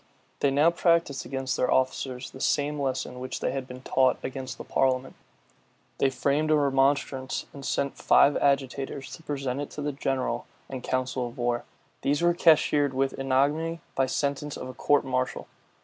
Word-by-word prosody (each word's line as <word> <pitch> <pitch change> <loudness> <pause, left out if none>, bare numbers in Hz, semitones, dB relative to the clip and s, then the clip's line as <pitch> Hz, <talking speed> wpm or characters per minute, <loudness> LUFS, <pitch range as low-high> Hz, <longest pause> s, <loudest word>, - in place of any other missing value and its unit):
They 140 - +3
now 145 +5 +4
practised 170 -6 +1
against 135 -1 -2
their - - +1
officers 130 0 0
the 130 - -10
same 145 +1 +1
lesson 130 -2 -2
which 130 0 -4
they - - -1
had 135 -1 -4
been 125 0 -10
taught 130 -1 +3
against 130 -1 -5
the - - -7
parliament. 130 0 0 0.9
They 135 - +4
framed 145 +3 0
a 155 - +5
remonstrance, 135 -2 +1
and 140 - -9
sent 140 0 -1
five 145 - +5
agitators 135 -1 0
to - - -15
present 140 -3 -3
it 145 - -5
to 150 - -7
the 145 - -1
general 135 -1 -2 0.2
and 130 -2 -6
council 130 -1 -1
of 120 +3 -11
war: 120 -1 -1 0.4
these 145 +4 +1
were 175 0 +4
cashiered 150 -4 +4
with 135 0 0
ignominy 145 +5 +1
by 135 - +1
sentence 140 +2 -2
of - - -6
a 130 - -7
court 145 +3 +2
martial. 130 -1 -1
135 Hz, 175 wpm, -27 LUFS, 130-145 Hz, 0.9 s, a